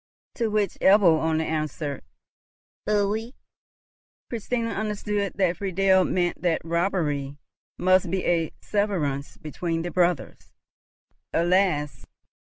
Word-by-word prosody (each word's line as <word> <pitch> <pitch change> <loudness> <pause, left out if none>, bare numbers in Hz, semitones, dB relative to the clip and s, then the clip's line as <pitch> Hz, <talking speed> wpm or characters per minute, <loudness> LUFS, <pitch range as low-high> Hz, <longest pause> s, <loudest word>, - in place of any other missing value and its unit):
To 230 - -1
which 210 -2 -1
Ebbo 190 -5 +5
only 160 0 0
answered, 155 -2 -3 0.9
"Pfui!" 210 +3 0 1.0
Christina 230 0 -2
understood 210 -1 -2
that 185 -3 +1
Friedel 190 -1 +3
meant 175 -1 -1
that 170 -2 0
robbery 165 -5 -1 0.4
must 185 +1 +3
be 190 -1 -1
a 165 -2 +1
severance 165 -10 -1
between 165 +2 -3
the 175 - -4
brothers. 175 -4 -1 0.8
Alas! 170 -4 +1
180 Hz, 100 wpm, -25 LUFS, 160-200 Hz, 1.0 s, Ebbo